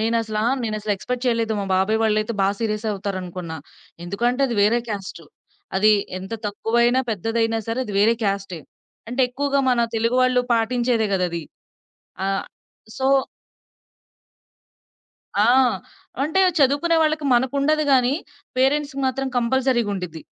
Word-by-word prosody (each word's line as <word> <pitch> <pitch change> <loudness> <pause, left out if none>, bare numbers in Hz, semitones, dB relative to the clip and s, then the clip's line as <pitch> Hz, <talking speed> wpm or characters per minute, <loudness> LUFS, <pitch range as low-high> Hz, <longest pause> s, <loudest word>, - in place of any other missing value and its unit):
నేనసల 225 -1 0 0.2
నేనసలు 215 -1 -2
ఎక్స్‌పెక్ట్ 250 +6 -4
చేయలేదు. 230 -2 +1
మా - - -2
బాబాయ్ 195 +4 +2
వాళ్ళైతే 215 0 +1
బా 195 - +3
సీరియస్ 215 -1 -2
అవుతారనుకున్నా. 185 -4 -5 0.5
ఎందుకంటే 240 +8 -1
అది 240 - -3
వేరే 225 +4 +4
క్యాస్టు. 205 -2 -6 0.5
అది 215 +3 +5 0.3
ఎంత 190 +3 -9
తక్కువైనా, 235 +4 +1
పెద్దదైనా 225 +2 0
సరే 225 +2 -2
అది 210 - -7
వేరే 225 +3 +4
క్యాస్టే. 195 -4 -2 0.5
అంటే 245 +3 -2
ఎక్కువగా 280 +2 0
మన 245 -1 +2
తెలుగు 230 +2 +1
వాళ్ళు 255 0 +3
పాటించేదే 235 0 +1
గదది. 175 -3 -1 0.8
ఆహ్, 195 0 -1 0.5
సో 265 0 -1 2.3
ఆ! - - +5 0.8
అంటే 315 +6 +2 0.2
చదువుకునే 285 +5 +3
వాళ్ళకి 310 -1 +1
మనకుండదు 280 +5 +2
గాని, 255 -1 +4 0.4
పేరెంట్స్‌కి 275 +1 +1
మాత్రం 270 +1 -2
కంపల్సరీ‌గుండిద్ది. 235 - 0
230 Hz, 120 wpm, -22 LUFS, 205-255 Hz, 2.3 s, అది